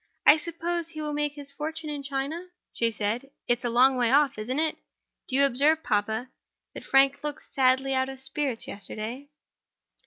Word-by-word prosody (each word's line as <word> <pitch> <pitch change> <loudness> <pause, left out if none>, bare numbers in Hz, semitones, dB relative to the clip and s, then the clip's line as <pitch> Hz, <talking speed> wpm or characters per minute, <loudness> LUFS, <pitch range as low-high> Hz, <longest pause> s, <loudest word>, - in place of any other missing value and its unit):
"I 300 - +8
suppose 335 +1 -3
he 315 -2 -9
will 300 -1 -2
make 295 0 0
his 285 -1 -10
fortune 310 +2 -5
in 290 -1 -4
China?" 280 +6 -3 0.3
she 230 - +1
said. 225 +5 -2 0.2
"It's 240 -1 +1
a 240 - 0
long 255 +3 +4
way 240 -2 +3
off, 275 -3 +3
isn't 250 +5 -3
it? 315 0 +1 0.5
Did 260 - 0
you 280 +1 +6
observe, 290 +5 +3
papa, 220 +3 -1 0.4
that - - -8
Frank 270 +1 +3
looked 295 0 -4
sadly 265 0 +2
out 260 0 +1
of 270 -1 -8
spirits 270 -2 -2
yesterday?" 220 +7 -6
275 Hz, 180 wpm, -27 LUFS, 250-295 Hz, 0.5 s, I